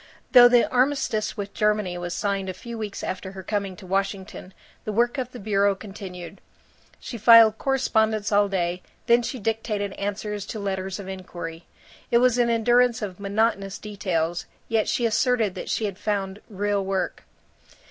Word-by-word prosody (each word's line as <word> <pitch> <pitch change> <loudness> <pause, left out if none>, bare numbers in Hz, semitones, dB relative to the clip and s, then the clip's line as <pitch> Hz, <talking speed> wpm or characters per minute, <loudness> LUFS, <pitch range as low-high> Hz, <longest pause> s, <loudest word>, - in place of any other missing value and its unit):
Though 245 -1 +9
the 245 -1 +4
armistice 255 -4 0
with 200 -1 -5
Germany 210 -4 +1
was 175 0 -4
signed 200 -2 -1
a 185 - -5
few 235 +5 -8
weeks 215 -3 -5
after 190 +1 -5
her 190 -1 -8
coming 200 -1 -2
to 190 - -13
Washington, 195 0 -3 0.3
the 215 - -3
work 240 +5 +1
of 250 -1 -4
the 250 - -9
bureau 200 -1 +2
continued. 190 -2 -9 0.6
She 235 - -7
filed 225 0 +7
correspondence 220 -6 +1
all 205 0 +3
day; 180 -2 -1 0.2
then 235 +1 +5
she 250 +2 -4
dictated 210 -2 -2
answers 205 0 -4
to 220 - -5
letters 190 -1 -3
of 195 - -8
inquiry. 175 -3 -7 0.4
It 235 - +4
was 250 0 +3
an 240 -1 +3
endurance 240 +1 +3
of 190 -3 -5
monotonous 200 -1 0
details, 175 -5 -2 0.2
yet 225 -2 +1
she 235 +3 +1
asserted 230 -2 +2
that 185 - -7
she 220 - 0
had 200 -2 -5
found 200 -1 -2
"real 205 -1 -1
work." 190 -1 -2
205 Hz, 170 wpm, -24 LUFS, 190-225 Hz, 0.6 s, Though